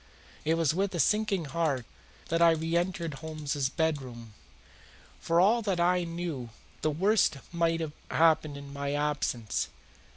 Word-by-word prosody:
It 160 Hz, +2 st, +2 dB
was 165 Hz, -3 st, +2 dB
with 195 Hz, +1 st, -1 dB
a -, -, -2 dB
sinking 210 Hz, -3 st, +2 dB
heart 140 Hz, -4 st, -1 dB, 0.4 s
that 165 Hz, +1 st, +1 dB
I 170 Hz, -, +8 dB
reentered 170 Hz, +1 st, -1 dB
Holmes's 145 Hz, -2 st, -3 dB
bedroom. 130 Hz, -8 st, -3 dB, 0.9 s
For 165 Hz, +1 st, +2 dB
all 215 Hz, +6 st, +4 dB
that 195 Hz, -5 st, -1 dB
I 175 Hz, 0 st, +3 dB
knew 165 Hz, -7 st, -4 dB, 0.3 s
the 155 Hz, -, +2 dB
worst 185 Hz, +1 st, +2 dB
might 165 Hz, -1 st, +1 dB
have 155 Hz, -2 st, -4 dB, 0.2 s
happened 155 Hz, -3 st, +3 dB
in 140 Hz, 0 st, -9 dB
my 140 Hz, 0 st, -3 dB
absence. 145 Hz, -7 st, -1 dB
160 Hz, 140 wpm, -29 LUFS, 145-175 Hz, 0.9 s, I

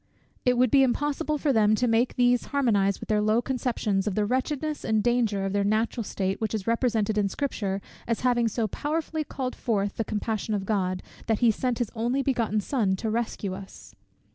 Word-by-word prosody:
It 250 Hz, -1 st, +3 dB
would 250 Hz, -2 st, +3 dB
be 275 Hz, -, +6 dB
impossible 290 Hz, +4 st, +1 dB
for 285 Hz, -1 st, +1 dB
them 215 Hz, -2 st, +4 dB
to 245 Hz, +3 st, +1 dB
make 230 Hz, +2 st, +2 dB
these 245 Hz, -1 st, +3 dB
harmonize 205 Hz, -9 st, +1 dB
with -, -, -8 dB
their 210 Hz, -1 st, +2 dB
low 215 Hz, +2 st, +3 dB
conceptions, 235 Hz, -6 st, -1 dB
of 200 Hz, -, -1 dB
the 210 Hz, -, +1 dB
wretchedness 290 Hz, +6 st, -1 dB
and 220 Hz, -1 st, +1 dB
danger 230 Hz, -5 st, +1 dB
of 195 Hz, -, -2 dB
their 200 Hz, 0 st, +2 dB
natural 220 Hz, +3 st, 0 dB
state, 195 Hz, -1 st, -2 dB
which 220 Hz, 0 st, -1 dB
is 200 Hz, -3 st, -4 dB
represented 230 Hz, -3 st, +1 dB
in 200 Hz, -1 st, +1 dB
Scripture 200 Hz, -6 st, -2 dB, 0.2 s
as 230 Hz, -1 st, -1 dB
having 240 Hz, -2 st, +2 dB
so 225 Hz, 0 st, -1 dB
powerfully 310 Hz, +6 st, -2 dB
called 260 Hz, -3 st, -4 dB
forth 205 Hz, -4 st, -1 dB
the 225 Hz, -, +1 dB
compassion 215 Hz, 0 st, -2 dB
of 195 Hz, -1 st, -3 dB
God, 185 Hz, -3 st, -1 dB, 0.2 s
that 225 Hz, -, +2 dB
he 235 Hz, 0 st, +4 dB
sent 245 Hz, +2 st, -1 dB
his 240 Hz, -4 st, -2 dB
only 240 Hz, +4 st, 0 dB
begotten 230 Hz, -5 st, 0 dB
Son 205 Hz, -5 st, 0 dB
to 220 Hz, +3 st, -3 dB
rescue 220 Hz, -4 st, -2 dB
us. 195 Hz, 0 st, -10 dB
225 Hz, 200 wpm, -26 LUFS, 205-250 Hz, 0.2 s, be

